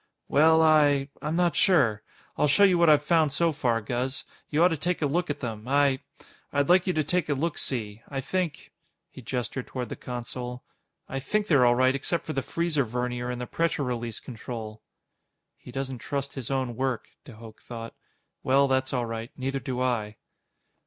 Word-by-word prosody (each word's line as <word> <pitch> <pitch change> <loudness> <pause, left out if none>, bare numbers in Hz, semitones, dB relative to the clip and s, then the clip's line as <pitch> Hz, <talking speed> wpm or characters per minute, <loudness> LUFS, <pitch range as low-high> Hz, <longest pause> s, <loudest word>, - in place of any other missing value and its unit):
"Well, 160 +3 +5
I... 145 -3 +4
I'm 150 +2 -2
not 175 -1 +2
sure. 125 - +3 0.3
I'll 150 - +2
show 145 +8 +5
you 185 -3 +5
what 170 -1 +6
I've 150 -1 +5
found 160 -2 +3
so 170 +3 +2
far, 120 -6 0
Guz. 125 +4 -3 0.3
You 155 +2 +3
ought 180 - +6
to 165 - 0
take 175 +2 -1
a - - +4
look 170 +5 0
at 145 -1 -3
them. 110 -2 -5
I... 140 -1 +3 0.5
I'd 145 0 +1
like 180 +1 +5
you 185 - +2
to 155 -1 +1
take 175 +2 -1
a 145 - +2
look 160 +4 -1
see. 110 -4 -3
I 135 - -3
think" 165 +2 -3 0.4
he - - -11
gestured 125 +1 -4
toward 125 -2 -5
the - - -4
console 125 0 -6 0.4
"I 135 - -3
think 210 +10 0
they're 140 -10 +5
all 120 - +4
right 130 +1 +4
except 150 +5 -2
for 155 - -4
the 135 - 0
freezer 165 -1 0
vernier 125 +1 -3
and 125 0 -3
the 125 - -3
pressure 165 +2 0
release 120 -3 -3
control." 110 -3 -7 0.7
He - - -13
doesn't 135 -1 -4
trust 140 +3 -3
his 130 -5 -6
own 130 -3 -1
work, 130 -2 -2
de 130 - -12
Hooch 110 0 -12
thought. 115 -1 -8 0.5
_Well, 140 +1 +4
that's 130 0 0
all 125 -2 0
right. 115 0 -5
Neither 135 +1 -2
do 125 -2 -3
I. 110 -4 -1
135 Hz, 200 wpm, -27 LUFS, 125-155 Hz, 0.7 s, what